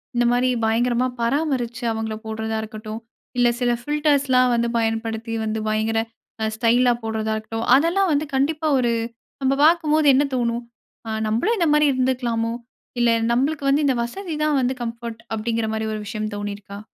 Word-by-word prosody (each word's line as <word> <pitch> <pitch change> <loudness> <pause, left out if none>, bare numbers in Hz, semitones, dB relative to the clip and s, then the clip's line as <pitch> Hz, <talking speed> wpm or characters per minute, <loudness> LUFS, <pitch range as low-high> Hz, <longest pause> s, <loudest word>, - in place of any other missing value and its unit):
இந்தமாரி 245 +1 +2 0.2
பயங்கரமா 240 +2 +2
பராமரிச்சு 245 -2 -1
அவுங்கள 220 -1 -3
போடுறதா 220 0 -3
இருக்கட்டும், 215 0 -7 0.4
இல்ல 245 0 +4
சில 245 -1 +2
ஃபில்டர்ஸ்லாம் 280 -3 +2
வந்து 235 0 +1
பயன்படுத்தி 225 0 -2
வந்து 220 0 -2
பயங்கர 220 +1 +1 0.4
அ - - +1
ஸ்டைலா 240 +2 +3
போடுறதா 220 -1 -2
இருக்கட்டும். 225 +1 -4
அதெல்லாம் 345 +7 +2
வந்து 295 +1 +1
கண்டிப்பா 305 +3 +1
ஒரு 240 -2 +2 0.5
நம்ப 270 0 +2
பார்க்கும்போது 310 -2 +3
என்ன 275 +2 +4
தோணும்? 235 -1 -1 0.4
ஆ. - - -4 0.2
நம்பளும் 240 - +1
இந்தமாரி 300 -4 +3
இருந்துக்கலாமோ! 245 -3 0 0.5
இல்ல 240 - +4 0.2
நம்மளுக்கு 275 +4 0
வந்து 290 +2 +3
இந்த 265 - +2
வசதிதான் 305 +1 -1
வந்து 255 +1 +1
கம்ஃபோர்ட், 230 -1 -6 0.2
அப்பிடிங்கிறமாரி 220 0 -2
ஒரு 215 - -3
விஷயம் 215 0 -3
தோணிருக்கா? 205 0 -6
240 Hz, 140 wpm, -22 LUFS, 225-275 Hz, 0.5 s, இல்ல